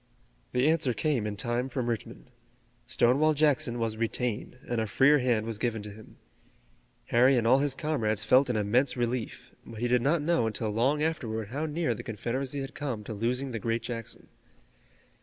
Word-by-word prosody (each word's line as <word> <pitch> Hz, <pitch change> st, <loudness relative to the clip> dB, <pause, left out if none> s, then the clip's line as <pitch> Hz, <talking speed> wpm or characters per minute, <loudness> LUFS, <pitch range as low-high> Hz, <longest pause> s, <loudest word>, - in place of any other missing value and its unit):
The 125 Hz, +3 st, +2 dB
answer 155 Hz, -6 st, +2 dB
came 140 Hz, -9 st, 0 dB
in 105 Hz, -, -4 dB
time 120 Hz, +3 st, -1 dB
from 125 Hz, -2 st, -3 dB
Richmond. 110 Hz, -, -5 dB, 0.6 s
Stonewall 145 Hz, +6 st, +3 dB
Jackson 145 Hz, -4 st, +2 dB
was 115 Hz, -2 st, -2 dB
retained 115 Hz, +1 st, -2 dB
and 120 Hz, -2 st, -1 dB
a 110 Hz, -, -2 dB
freer 140 Hz, +7 st, +4 dB
hand 120 Hz, -4 st, +1 dB
was 115 Hz, -2 st, -4 dB
given 115 Hz, -3 st, -2 dB
to 105 Hz, -, -7 dB
him. 110 Hz, +2 st, -14 dB, 0.9 s
Harry 125 Hz, +3 st, +5 dB
and 115 Hz, -, +1 dB
all 130 Hz, +4 st, +5 dB
his 140 Hz, -1 st, +1 dB
comrades 115 Hz, -10 st, -1 dB
felt 130 Hz, +1 st, +4 dB
an 125 Hz, -, 0 dB
immense 125 Hz, +5 st, +1 dB
relief, 120 Hz, -1 st, -3 dB
but 115 Hz, -2 st, -10 dB
he 120 Hz, -, 0 dB
did 125 Hz, 0 st, +2 dB
not 145 Hz, +4 st, +1 dB
know 155 Hz, -8 st, +2 dB
until 110 Hz, 0 st, -2 dB
long 135 Hz, +8 st, +1 dB
afterward 110 Hz, -9 st, -2 dB
how 145 Hz, +6 st, -3 dB
near 160 Hz, +2 st, -1 dB
the -, -, -7 dB
Confederacy 130 Hz, +5 st, -3 dB
had 135 Hz, +1 st, -6 dB
come 125 Hz, -7 st, -4 dB
to 110 Hz, -, -6 dB
losing 125 Hz, +5 st, -2 dB
the 115 Hz, -, -3 dB
great 115 Hz, +1 st, -1 dB
Jackson. 115 Hz, -2 st, -7 dB
120 Hz, 185 wpm, -28 LUFS, 115-140 Hz, 0.9 s, Harry